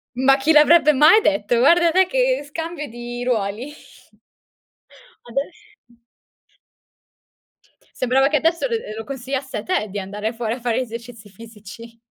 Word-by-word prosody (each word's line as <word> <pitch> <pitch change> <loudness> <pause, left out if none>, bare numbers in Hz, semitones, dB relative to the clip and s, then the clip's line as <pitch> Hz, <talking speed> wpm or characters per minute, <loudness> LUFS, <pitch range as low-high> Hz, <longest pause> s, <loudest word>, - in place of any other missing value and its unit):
Ma 270 +2 +3
chi 290 +4 +1
l'avrebbe 305 0 +5
mai 305 +11 +6
detto? 205 - 0
Guarda 335 +7 +4
te 375 +2 +4
che - - 0
scambio 325 0 -6
di 240 +1 -7
ruoli. 235 +3 -3 1.5
Adess 280 - -8 1.9
Sembrava 260 +2 +1
che 300 +1 +1
adesso 335 - 0
lo 470 - -2
lo 215 - -6
lo 225 - -6
consigliasse 265 -2 -5
a 210 - -5
te 215 0 -1
di 200 +1 -5
andare 210 +4 -5
fuori 230 -1 -3
a - - -11
fare 240 0 -1
esercizi 230 -2 -9
fisici. 230 +2 -13
255 Hz, 140 wpm, -20 LUFS, 230-305 Hz, 1.9 s, mai